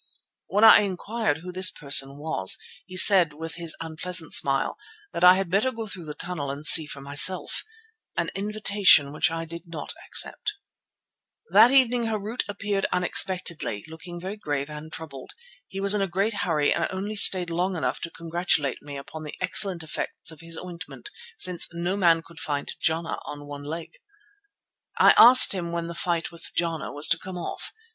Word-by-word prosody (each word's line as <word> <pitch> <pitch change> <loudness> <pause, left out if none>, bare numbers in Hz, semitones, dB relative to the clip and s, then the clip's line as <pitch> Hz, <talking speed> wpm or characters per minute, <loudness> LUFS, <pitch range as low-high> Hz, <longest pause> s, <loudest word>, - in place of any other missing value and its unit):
When 205 +2 0
I 225 - +9
inquired 205 -3 -3
who 180 - -7
this 185 +1 +5
person 140 -1 +2
was 145 -11 0 0.3
he 185 -1 -9
said 185 -5 +6
with 160 +2 -7
his 170 -2 -4
unpleasant 165 +1 -3
smile 135 -1 +1 0.4
that 170 - -4
I 180 +1 +8
had 190 -2 -3
better 210 +7 +1
go 225 -2 -7
through 190 -5 -6
the 150 -1 -8
tunnel 170 -5 -6
and 140 +2 -7
see 155 0 +8
for 140 - -9
myself, 145 +7 +2 0.5
an - - -2
invitation 200 -7 +3
which 155 - +2
I 165 0 -5
did 170 +1 -10
not 165 -3 -7
accept. 420 - -1 1.0
That 240 - +7
evening 250 -3 +3
Harût 220 +1 -3
appeared 200 -1 -2
unexpectedly, 175 - 0
looking 175 +2 -10
very 190 +4 -7
grave 145 -6 -4
and 150 +1 -10
troubled. 140 -6 -10 0.3
He 195 - -8
was 200 +1 +4
in 210 - 0
a 195 - 0
great 195 +5 -1
hurry 165 -7 0
and - - -1
only 200 +3 -5
stayed 185 -4 +4
long 180 +3 -2
enough 160 - -3
to 170 - -6
congratulate 165 -5 -2
me 145 -1 -9
upon 140 +3 -10
the 150 -1 -8
excellent 185 -5 -1
effects 160 +1 -6
of 160 -1 -13
his 165 0 -5
ointment, 180 -1 -10 0.3
since 180 -2 0
"no 175 +3 -3
man 170 -4 +2
could 165 -1 -15
fight 145 -1 -4
Jana 160 +1 -2
on 145 0 -9
one 145 0 -9
leg." 160 +2 -8 1.0
I - - +6
asked 250 -1 +9
him 175 -3 -4
when 170 0 -4
the 170 - -7
fight 170 0 -3
with 170 - -10
Jana 165 -2 -3
was 145 +1 +1
to 165 - +2
come 185 -1 -9
off. 175 - -6
170 Hz, 180 wpm, -24 LUFS, 155-195 Hz, 1.0 s, I